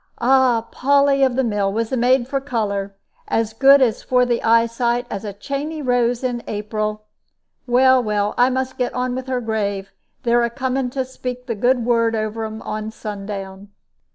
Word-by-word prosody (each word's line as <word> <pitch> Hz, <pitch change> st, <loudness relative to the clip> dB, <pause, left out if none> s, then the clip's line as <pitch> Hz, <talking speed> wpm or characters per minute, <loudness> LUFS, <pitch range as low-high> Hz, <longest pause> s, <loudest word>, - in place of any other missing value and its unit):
Ah! 245 Hz, -2 st, +3 dB
Polly 280 Hz, +1 st, +3 dB
of 260 Hz, -2 st, +3 dB
the 265 Hz, -, +1 dB
mill 205 Hz, -4 st, 0 dB
was 225 Hz, +2 st, -2 dB
the -, -, +1 dB
maid 245 Hz, 0 st, +2 dB
for 275 Hz, 0 st, -2 dB
color 200 Hz, -7 st, -2 dB, 0.3 s
as 225 Hz, -1 st, -1 dB
good 275 Hz, +4 st, +6 dB, 0.2 s
for 250 Hz, -1 st, +1 dB
the 240 Hz, -1 st, 0 dB
eyesight 230 Hz, +1 st, +2 dB
as 200 Hz, -, -4 dB
a 210 Hz, -, -4 dB
chaney 280 Hz, +10 st, -5 dB
rose 245 Hz, -2 st, +1 dB
in 245 Hz, -2 st, -2 dB
April. 215 Hz, 0 st, -3 dB, 0.6 s
Well, 260 Hz, +1 st, +5 dB
well, 210 Hz, -2 st, -1 dB
I 245 Hz, +1 st, +4 dB
must 260 Hz, 0 st, -3 dB
get 250 Hz, -, -1 dB
on 250 Hz, 0 st, -1 dB
with 260 Hz, +1 st, -5 dB
her 255 Hz, -1 st, -1 dB
grave; 205 Hz, -3 st, -2 dB, 0.3 s
they're 240 Hz, 0 st, +3 dB
a 235 Hz, -, +1 dB
coming 260 Hz, +1 st, -2 dB
to 260 Hz, +1 st, -3 dB
speak 250 Hz, -1 st, -6 dB
the 235 Hz, -, -2 dB
good 245 Hz, +2 st, +1 dB
word 230 Hz, -1 st, +2 dB
over 215 Hz, +1 st, -3 dB
un 220 Hz, 0 st, -7 dB
on 215 Hz, 0 st, -4 dB
sundown." 200 Hz, -2 st, -7 dB
240 Hz, 180 wpm, -20 LUFS, 215-255 Hz, 0.6 s, good